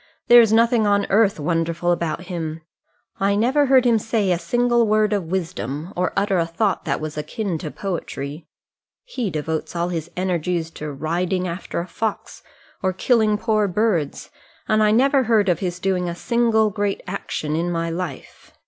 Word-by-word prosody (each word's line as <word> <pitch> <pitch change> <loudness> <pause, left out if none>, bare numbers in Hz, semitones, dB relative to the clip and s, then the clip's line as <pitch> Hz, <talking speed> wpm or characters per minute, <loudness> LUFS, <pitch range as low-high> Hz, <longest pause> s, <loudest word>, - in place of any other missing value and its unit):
There 240 0 +10
is 225 -2 +3
nothing 230 -1 +4
on 200 0 +2
earth 200 -3 +3
wonderful 165 +2 0
about 170 -1 -1
him. 165 -3 -5 0.6
I 200 +1 +2
never 260 +7 +2
heard 260 -1 +5
him 230 -2 +4
say 215 -3 0
a 175 - +1
single 240 +5 +2
word 215 0 +2
of 200 -4 -1
wisdom, 160 - -4
or 180 +1 0
utter 195 -2 +2
a 165 - +1
thought 195 +4 -1
that 140 -4 -1
was 155 -1 -5
akin 190 +1 -3
to 155 - -5
poetry. 155 -4 -5 0.6
He 255 - -3
devotes 160 +1 -3
all 170 +1 -1
his 165 -2 -4
energies 175 -2 -1
to 150 -2 -6
riding 175 +6 -1
after 170 0 -4
a - - -5
fox 220 +3 -4 0.4
or 185 -1 0
killing 215 +1 +2
poor 215 -1 +1
birds, 185 -6 -1 0.4
and 215 0 +3
I 215 - +4
never 265 +4 +3
heard 215 -4 +3
of 175 - +1
his 180 -2 -3
doing 180 -1 -1
a 170 - -4
single 225 0 +2
great 205 0 -2
action 155 -5 -3
in 170 +2 -1
my 165 -1 -2
life. 170 -5 -7
185 Hz, 175 wpm, -22 LUFS, 165-215 Hz, 0.6 s, There